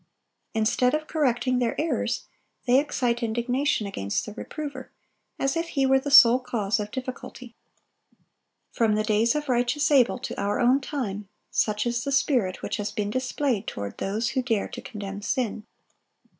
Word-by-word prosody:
Instead 245 +4 +2
of 310 0 -3
correcting 255 -5 +1
their 240 -2 -1
errors, 320 +1 -1 0.4
they 255 +1 +5
excite 250 -4 -1
indignation 240 +2 0
against 100 - -2
the 210 - -8
reprover, 290 +5 -7 0.5
as 275 +3 0
if 330 0 -1
he 275 -4 0
were 265 0 +4
the 285 - -4
sole 245 -3 +8
cause 220 -5 -1
of 210 0 -3
difficulty. 255 -1 -7 1.2
From 220 -2 +2
the 215 - +1
days 220 +4 +2
of 300 0 -2
righteous 250 +4 +1
Abel 260 -4 +4
to 255 - -6
our 200 +1 0
own 250 +3 +4
time, 210 -9 -4 0.2
such 210 +1 +1
is 240 0 -1
the 280 - -2
spirit 245 -9 +1
which - - -2
has 205 -1 -3
been 205 -1 -2
displayed 255 -3 -1
toward 100 0 -5
those 215 +4 -1
who 260 +2 0
dare 230 -5 -1
to - - -7
condemn 200 -2 -7
sin. 220 -1 -2
240 Hz, 165 wpm, -26 LUFS, 210-270 Hz, 1.2 s, sole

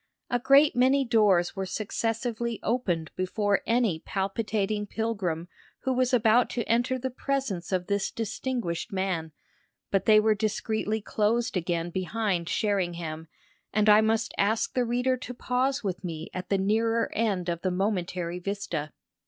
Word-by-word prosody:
A 245 - +2
great 275 +4 +5
many 265 +2 +4
doors 210 -7 +3
were 190 -1 -3
successively 225 +3 -2
opened 185 -9 -1
before 200 +2 0
any 230 -8 +2
palpitating 205 +2 -2
pilgrim 195 -7 -2 0.3
who 260 - 0
was 255 0 +1
about 235 0 +4
to 235 - -2
enter 240 +3 +2
the 260 +1 -3
presence 255 -10 -2
of 185 -1 0
this 200 0 0
distinguished 225 -4 -3
man; 185 -4 -2 0.6
but 195 -1 +1
they 215 -1 +7
were 215 0 +4
discreetly 215 +1 -1
closed 225 +3 0
again 175 -1 -1
behind 185 -2 -1
Sherringham, 175 -6 -1 0.4
and 215 0 +2
I 210 +1 +8
must 225 +1 +1
ask 215 +3 +1
the 250 -1 +1
reader 250 +2 +1
to 250 0 -7
pause 260 +3 0
with 185 -2 -3
me 165 -3 -5
at 180 0 -5
the 195 - +2
nearer 225 +4 +1
end 200 -5 0
of 170 -1 -2
the 185 - 0
momentary 180 -2 -2
vista. 190 -6 -4
210 Hz, 150 wpm, -27 LUFS, 185-235 Hz, 0.6 s, I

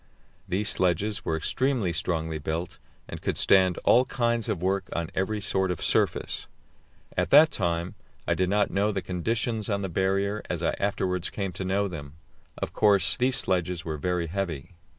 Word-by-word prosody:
These 105 +4 +1
sledges 95 +4 +1
were 80 - -1
extremely 120 - 0
strongly 80 -1 -1
built, 80 +4 -4 0.3
and - - -8
could - - -2
stand 95 -2 +4
all 125 +2 +5
kinds 120 -3 0
of 90 - -1
work 95 +1 -1
on 85 +1 -3
every 105 +3 -1
sort 95 -2 0
of 90 - -3
surface. - - 0 0.7
At - - 0
that 155 +3 +7
time 85 -2 -1 0.3
I - - +3
did 90 -1 0
not 105 +1 +2
know 100 +2 +1
the 95 -2 -3
conditions 110 +4 -2
on 100 -1 -1
the 95 - -2
Barrier 100 +4 0
as 85 -1 -3
I - - +2
afterwards 95 -2 -1
came 100 -2 -3
to 90 +2 -6
know 100 +2 0
them. 70 -6 -8 0.4
Of - - -4
course, 100 -4 +3
these 125 +1 +2
sledges 90 -6 0
were 80 -2 -3
very 90 +1 -1
heavy. 85 -2 -4
95 Hz, 175 wpm, -27 LUFS, 85-105 Hz, 0.7 s, that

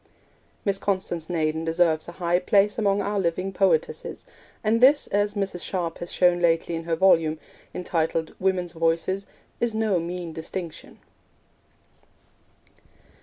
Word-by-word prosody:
Miss 200 -1 +1
Constance 185 -5 -2
Naden 160 -2 0
deserves 165 -1 +2
a 175 - -8
high 175 0 +1
place 205 +3 +2
among 200 -2 +2
our 205 0 -1
living 185 +2 -1
poetesses, 465 - 0 0.4
and 225 +2 +2
this, 285 +3 +6
as 205 +1 0
Mrs. 195 -3 -2
Sharp 170 -3 -2
has 175 - -5
shown 180 -1 +3
lately 170 0 +1
in 165 0 -4
her 165 -1 0
volume, 165 -3 +4 0.3
entitled 165 -2 -1
Women's 185 -2 0
Voices, 165 +4 0 0.3
is 235 -2 0
no 215 -5 +1
mean 170 0 -5
distinction. 165 +1 -7
180 Hz, 130 wpm, -25 LUFS, 165-200 Hz, 0.4 s, this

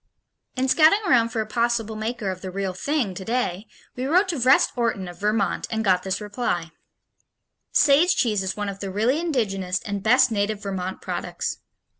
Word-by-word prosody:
In 260 0 0
scouting 320 +9 +5
around 235 -7 +4
for 225 -1 -2
a - - -3
possible 230 0 -1
maker 215 -2 -3
of 185 0 -8
the 190 - -5
real 190 0 -3
thing 250 0 -1
today, 200 0 -2 0.3
we 255 +1 -3
wrote 365 +7 +3
to 335 - -1
Vrest 255 +3 +4
Orton 230 -6 -1
of 175 -1 -10
Vermont, 210 0 0
and 220 0 -2
got 185 -2 +3
this 190 0 -2
reply: 205 -6 -3 1.0
Sage 300 +5 +4
cheese 215 -5 +1
is 190 +1 -3
one 205 -1 -2
of 195 -1 -5
the 195 - -4
really 225 +9 +1
indigenous 195 - -1
and 200 -1 -4
best 250 +4 +4
native 210 0 -1
Vermont 190 -2 -4
products. - - -4
215 Hz, 180 wpm, -24 LUFS, 195-250 Hz, 1.0 s, scouting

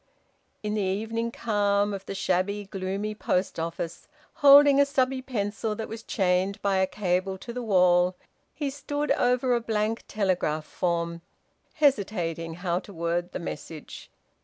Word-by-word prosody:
In 210 0 -2
the 215 - 0
evening 225 +4 -1
calm 205 -3 +1
of 195 0 -7
the 195 - -4
shabby, 195 +3 0
gloomy 195 +2 -3
post 185 -4 -1
office, 165 0 -4 0.3
holding 285 -1 +7
a - - +5
stubby 265 -1 +1
pencil 220 -3 -2
that 220 +1 -5
was 225 0 -7
chained 190 -1 0
by 200 -1 +2
a 190 0 +3
cable 190 -1 -1
to 235 +5 -8
the 250 - -4
wall, 180 -4 +4 0.4
he 285 -3 -3
stood 290 +1 -3
over 250 +1 +2
a 240 - +1
blank 220 0 -1
telegraph 180 -7 0
form, 170 -1 -2 0.5
hesitating 185 - 0
how 175 0 -1
to 200 - -12
word 170 0 -2
the - - -4
message. 160 -2 -8
200 Hz, 150 wpm, -27 LUFS, 180-230 Hz, 0.5 s, holding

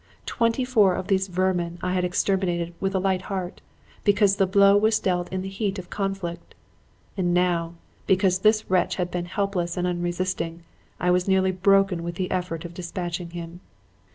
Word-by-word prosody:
Twenty 230 +2 0
four 210 -8 +4
of 190 - -5
these 190 -1 +2
vermin 180 -2 -1
had 180 0 0
I - - +2
exterminated 175 -2 0
with 195 0 -1
a - - +3
light 190 -1 0
heart, 185 -3 -4 0.4
because 205 -1 +3
the 195 - +3
blow 200 +1 +5
was 215 +2 +3
dealt 180 -2 -1
in 185 0 -3
the - - -5
heat 195 +1 -2
of 185 -2 -9
conflict; 195 -4 -4 0.6
and 175 -2 0
now, 170 -2 +1 0.3
because 185 -1 +3
this 215 +2 +3
wretch 185 -1 +1
had 180 -1 -2
been 175 -1 -2
helpless 185 -2 -2
and 180 - 0
unresisting, 175 -1 -2 0.4
I 180 - +2
was 180 +1 +1
nearly 190 -1 +3
broken 195 -1 +3
with 170 0 -5
the 180 0 -3
effort 180 -2 -3
of 175 - -8
dispatching 175 0 -5
him. 170 0 -8
185 Hz, 180 wpm, -24 LUFS, 175-195 Hz, 0.6 s, blow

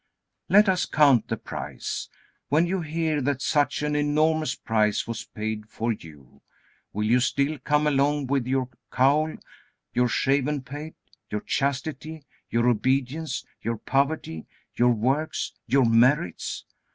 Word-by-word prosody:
Let 205 +2 +6
us 185 -2 +2
count 140 -6 +4
the - - -2
price. - - -5 0.4
When 155 +4 +3
you 185 +1 -1
hear 160 -1 -1
that 140 0 0
such 145 +1 +1
an 150 0 0
enormous 155 -1 +1
price 105 -2 +1
was 115 -1 -5
paid 110 0 -5
for 115 +2 -2
you, 75 - -14 0.5
will 105 +1 -2
you 120 +4 +4
still 140 +4 0
come 150 +3 +1
along 145 0 +2
with 135 -2 0
your 130 -1 0 0.2
cowl, 145 +5 +2 0.6
your 125 0 +3
shaven 135 +3 +1
pate, 145 +4 -8 0.3
your 105 - -3
chastity, 145 +2 -2 0.3
your 115 +1 +1
obedience, 135 +5 0 0.2
your 115 0 -2
poverty, 135 - -1 0.3
your 120 0 +4
works, 130 +7 -1
your 130 +2 +4
merits? 115 - +2
135 Hz, 135 wpm, -25 LUFS, 120-150 Hz, 0.6 s, Let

